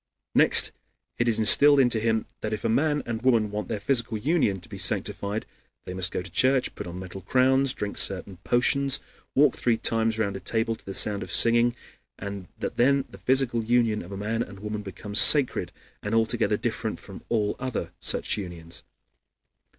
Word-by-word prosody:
Next - - +5 0.5
it 120 - +1
is 115 - +2
instilled 140 +6 +6
into 120 -4 +3
him 110 0 -1
that 110 0 -4
if 105 - -5
a 115 - 0
man 145 +5 0
and 115 -1 -5
woman 115 -5 +1
want 105 -2 -5
their 110 - -4
physical 120 0 0
union 130 - 0
to - - -10
be 100 -3 -10
sanctified 100 +2 -1 0.4
they 90 - -7
must 95 -1 0
go - - -4
to 90 - -11
church, 130 +6 +2
put - - -8
on 85 +1 -8
metal 95 +1 -9
crowns, 130 +5 +2
drink 105 -4 -4
certain 95 -1 0
potions, 135 +7 +2 0.4
walk 140 -1 +3
three 120 -2 0
times 115 0 0
round 100 -3 -2
a - - -5
table 115 +1 -2
to - - -17
the 95 - -6
sound 100 +2 +3
of 90 - -7
singing, 120 +3 +4 0.4
and 100 -2 -7
that - - -5
then 140 +2 +2
the 95 - -13
physical 125 +2 +2
union 115 -2 +1
of 85 - -12
a 100 - -6
man 110 +3 -3
and 100 -4 -8
woman 105 0 -5
becomes 100 +1 -3
sacred 140 -4 +4 0.3
and 105 +2 -3
altogether 110 -2 +1
different 110 -1 -4
from 95 - -12
all 105 -3 -1
other 130 -2 -4
such - - +1
unions. 85 -4 -8
110 Hz, 190 wpm, -25 LUFS, 100-120 Hz, 0.5 s, instilled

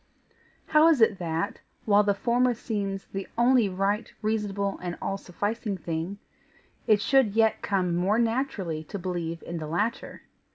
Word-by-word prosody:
How 310 +1 +5
is 325 -5 +4
it 220 -4 +4
that, 165 +3 -2 0.2
while 205 -1 +5
the 200 -1 +1
former 245 +3 +2
seems 200 -4 -3
the 195 0 -6
only 240 -3 +4
right, 200 +4 -1
reasonable, 205 -2 -1
and 175 -1 -4
all 195 - -2
sufficing 205 +2 -3
thing, 165 +3 -4 0.7
it 215 -2 +5
should 225 0 +3
yet 225 -1 +3
come 185 -3 0
more 190 +5 +2
naturally 225 - -1
to 200 - -6
believe 175 -3 -4
in 170 -1 -5
the 155 - -5
latter? 205 +9 -2
200 Hz, 155 wpm, -27 LUFS, 180-225 Hz, 0.7 s, How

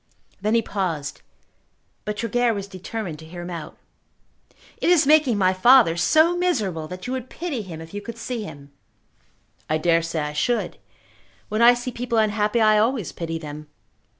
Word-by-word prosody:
Then 215 +3 +1
he 230 - +3
paused, 170 -9 -3 0.8
but 210 +1 -3
Tregear 235 +1 +1
was 200 -1 -4
determined 190 -3 -6
to 160 - -11
hear 175 +1 -8
him 175 - -7
out. 165 -3 -7 1.0
"It - - 0
is 350 -5 +5
making 295 -6 +4
my 185 -1 +3
father 230 -2 +6
so 315 - +4
miserable 215 - -1
that 185 +2 -8
you 250 - -3
would 260 -1 -5
pity 315 -8 -4
him 170 -5 -8
if 165 +2 -12
you 205 - -4
could 235 +2 -8
see 235 0 -4
him." 140 -8 -10 1.0
"I 155 - +2
dare 165 +1 +2
say 165 -1 -3
I 150 0 -3
should. 235 +11 -1 0.7
When 215 +1 -1
I 240 +1 +8
see 245 +1 -5
people 235 -1 -3
unhappy 215 +1 +1
I 215 -1 +5
always 225 -3 0
pity 165 -1 -4
them. 150 -1 -8
210 Hz, 175 wpm, -23 LUFS, 165-240 Hz, 1.0 s, I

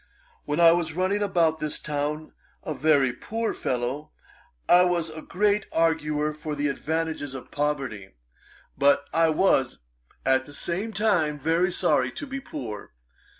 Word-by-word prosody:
When 150 +3 -1
I 170 -1 +8
was 165 -2 0
running 190 +3 0
about 170 -5 +2
this 150 -1 -2
town 150 +1 -3 0.3
a 155 - -3
very 140 -3 +3
poor 225 - -3
fellow, 130 +4 -3 0.6
I 180 +1 +7
was 175 -3 0
a 160 0 -8
great 205 +4 0
arguer 155 -2 +1
for 150 0 -5
the 145 0 0
advantages 155 -1 -3
of 130 - -9
poverty; 135 - -3 0.6
but 140 +1 +3
I 165 0 +4
was, 150 -6 +2 0.5
at 130 0 +3
the 145 - -13
same 195 +6 -3
time, 185 -8 +1
very 165 +5 +1
sorry - - +1
to 290 - -6
be 275 0 -5
poor. 115 - -7
155 Hz, 150 wpm, -26 LUFS, 145-175 Hz, 0.6 s, I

